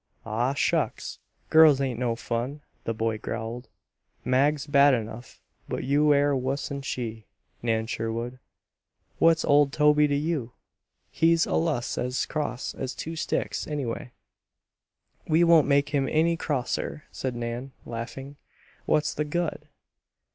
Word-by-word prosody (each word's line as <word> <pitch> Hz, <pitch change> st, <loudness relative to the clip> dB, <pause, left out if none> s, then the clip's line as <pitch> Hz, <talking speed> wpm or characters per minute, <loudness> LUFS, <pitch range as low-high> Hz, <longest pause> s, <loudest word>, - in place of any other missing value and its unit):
"Aw, 120 Hz, +5 st, 0 dB
shucks! 150 Hz, -4 st, -1 dB, 0.3 s
Girls 155 Hz, -3 st, +7 dB
ain't 130 Hz, -4 st, -1 dB
no 120 Hz, -2 st, 0 dB
fun," 125 Hz, +5 st, -3 dB, 0.2 s
the 115 Hz, -, -1 dB
boy 110 Hz, -1 st, -1 dB
growled. 115 Hz, +3 st, -5 dB, 0.6 s
"Mag's 140 Hz, +3 st, +2 dB
bad 140 Hz, -1 st, +5 dB
enough, 115 Hz, +1 st, -7 dB, 0.3 s
but -, -, -3 dB
you 145 Hz, +3 st, +3 dB
air 145 Hz, 0 st, +3 dB
wuss'n 135 Hz, +2 st, -2 dB
she, 115 Hz, -5 st, -5 dB, 0.3 s
Nan 110 Hz, -1 st, 0 dB
Sherwood. 115 Hz, +3 st, -4 dB, 0.8 s
What's 165 Hz, -1 st, +4 dB
old 145 Hz, -1 st, +4 dB
Toby 150 Hz, 0 st, +4 dB
to 145 Hz, -, 0 dB
you? 145 Hz, -5 st, -2 dB, 0.6 s
He's 165 Hz, +1 st, +3 dB
allus 150 Hz, -6 st, -1 dB
as 125 Hz, +1 st, -1 dB
cross 145 Hz, -5 st, -3 dB
as 130 Hz, -1 st, -5 dB
two 165 Hz, +1 st, -5 dB
sticks, 155 Hz, -, -2 dB
anyway." 130 Hz, -5 st, -4 dB, 1.2 s
"We 160 Hz, +2 st, +4 dB
won't 165 Hz, -3 st, +6 dB
make 140 Hz, 0 st, +3 dB
him 140 Hz, -2 st, 0 dB
any 165 Hz, +2 st, +2 dB
crosser," 145 Hz, -1 st, -2 dB
said 130 Hz, -2 st, -4 dB
Nan, 120 Hz, +3 st, -4 dB
laughing. 135 Hz, +4 st, -7 dB, 0.5 s
"What's 150 Hz, 0 st, +2 dB
the 150 Hz, -, -1 dB
good?" 155 Hz, -1 st, -3 dB
140 Hz, 130 wpm, -26 LUFS, 120-150 Hz, 1.2 s, Girls